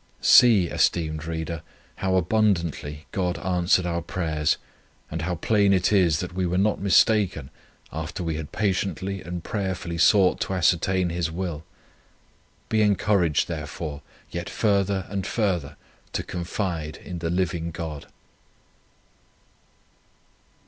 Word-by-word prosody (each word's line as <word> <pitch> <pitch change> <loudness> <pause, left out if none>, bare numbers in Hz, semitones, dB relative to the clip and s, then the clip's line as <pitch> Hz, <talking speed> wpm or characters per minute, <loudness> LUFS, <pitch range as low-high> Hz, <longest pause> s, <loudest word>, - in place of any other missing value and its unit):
See, 110 -7 +7
esteemed 80 -2 0
Reader, 80 -1 -4 0.4
how 95 -1 0
abundantly 85 -6 0
God 90 -2 -1
answered 90 0 +1
our 85 -1 -1
prayers, 80 -3 -1 0.5
and 80 +1 -3
how 90 +2 -1
plain 100 +3 +3
it 95 +2 +2
is, 85 -6 +3
that 90 -1 -5
we 90 0 -1
were 90 +1 0
not 100 +2 +1
mistaken, 100 -7 +3 0.4
after 80 +3 -4
we 80 -1 -1
had 75 -1 -6
patiently 100 -1 -1
and 90 -1 -6
prayerfully 95 -5 -3
sought 95 -1 +5
to 95 - -2
ascertain 90 0 +2
His 85 -1 -1
will. 85 -2 -4 1.0
Be 110 -1 +1
encouraged, 100 -6 +2
therefore, 75 -2 -5 0.3
yet 85 0 -4
further 100 -3 +1
and 100 -2 -3
further 95 -10 -1 0.4
to - - -1
confide 85 -3 -3
in 90 -1 -7
the 85 -1 -2
Living 85 -1 -1
God." 80 -3 -6
90 Hz, 125 wpm, -25 LUFS, 80-95 Hz, 1.0 s, See